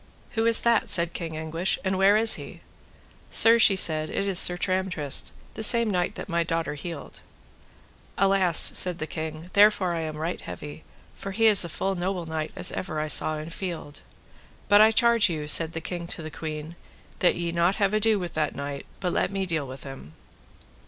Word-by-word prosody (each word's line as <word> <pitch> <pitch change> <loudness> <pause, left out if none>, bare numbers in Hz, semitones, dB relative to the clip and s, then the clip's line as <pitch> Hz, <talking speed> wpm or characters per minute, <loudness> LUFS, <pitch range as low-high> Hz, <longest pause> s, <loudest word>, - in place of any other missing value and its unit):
Who 225 -1 -1
is 230 - +5
that, 235 -2 +1
said 170 -1 +4
King 165 -2 -6
Anguish, 165 +3 -3
and 190 -1 -1
where 195 +2 +4
is 225 0 +5
he? - - -9 0.7
Sir, 230 +1 +5
she 205 -3 +6
said, 155 -4 +2
it 200 - -3
is 190 -2 +2
Sir 175 - +3
Tramtrist, 185 -6 -1 0.2
the 220 - -7
same 230 0 +5
knight 180 -2 -2
that - - -8
my 170 -2 -1
daughter 165 -2 -3
healed. 150 0 -9 1.0
Alas, 195 -3 +2 0.2
said 180 -2 +2
the 155 - -5
king, 160 +2 -7
therefore 205 -3 +3
am 160 -2 -5
I - - -9
right 165 +3 -4
heavy, 150 +1 -10 0.3
for 195 - -8
he 225 +3 +1
is 210 -4 +5
a 170 - -6
full 195 +5 -3
noble 180 -1 -4
knight 160 -1 -5
as - - 0
ever 155 -4 -5
I 155 0 -3
saw 155 +1 0
in 155 +2 -8
field. 170 -5 -7 0.7
But 205 0 +5
I 215 - +7
charge 235 -2 +3
you, 155 -3 -5
said 160 +2 +4
the 165 - -4
king 170 0 -6
to 170 - -7
the 155 - -8
queen, 155 +1 -7 0.4
that 180 - +2
ye 175 - -4
have - - -8
not 170 +3 +1
ado 215 0 +2
with 175 -3 -6
that 155 -1 -2
knight, 140 0 -7
but 180 -2 -2
let - - 0
me 195 -1 -3
deal 160 -6 -3
with 130 +1 -10
him. 135 - -11
175 Hz, 200 wpm, -25 LUFS, 155-195 Hz, 1.0 s, I